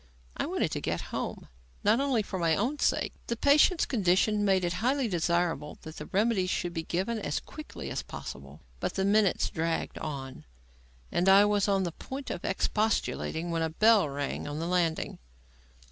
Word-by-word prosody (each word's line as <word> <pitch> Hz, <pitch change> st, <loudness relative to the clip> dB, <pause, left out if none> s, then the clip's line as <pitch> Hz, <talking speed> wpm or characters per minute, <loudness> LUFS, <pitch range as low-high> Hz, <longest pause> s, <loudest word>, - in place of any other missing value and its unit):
I -, -, -2 dB
wanted -, -, 0 dB
to -, -, -3 dB
get -, -, -1 dB
home, -, -, -4 dB, 0.4 s
not 215 Hz, +4 st, +4 dB
only 270 Hz, -6 st, +1 dB
for 190 Hz, -2 st, -5 dB
my 165 Hz, -2 st, +3 dB
own 260 Hz, +8 st, -1 dB
sake; -, -, +1 dB
the 235 Hz, -, -1 dB
patient's 295 Hz, -, +4 dB
condition 205 Hz, -2 st, +2 dB
made 190 Hz, -2 st, +3 dB
it 175 Hz, -, -1 dB
highly 260 Hz, +2 st, +2 dB
desirable 170 Hz, -4 st, 0 dB
that 160 Hz, 0 st, -9 dB
the -, -, -7 dB
remedies 200 Hz, -2 st, +1 dB
should 175 Hz, -1 st, -1 dB
be 165 Hz, -, -2 dB
given 190 Hz, +8 st, -2 dB
as 150 Hz, -8 st, -2 dB
quickly 305 Hz, -1 st, -8 dB
as -, -, -2 dB
possible. -, -, -9 dB, 0.2 s
But -, -, -3 dB
the 190 Hz, -, +1 dB
minutes 205 Hz, -1 st, +3 dB
dragged 165 Hz, 0 st, -2 dB
on, 135 Hz, -4 st, -6 dB, 0.7 s
and 180 Hz, +2 st, +2 dB
I 195 Hz, +2 st, +8 dB
was 205 Hz, -1 st, +2 dB
on 195 Hz, -1 st, +2 dB
the 175 Hz, -, -2 dB
point 265 Hz, -, -7 dB
of -, -, -5 dB
expostulating 200 Hz, -5 st, 0 dB
when 165 Hz, -1 st, 0 dB
a 160 Hz, -, 0 dB
bell 210 Hz, 0 st, +4 dB
rang 140 Hz, +1 st, -3 dB
on 145 Hz, 0 st, -4 dB
the 165 Hz, -, -2 dB
landing. 170 Hz, -2 st, 0 dB
190 Hz, 180 wpm, -29 LUFS, 165-220 Hz, 0.7 s, I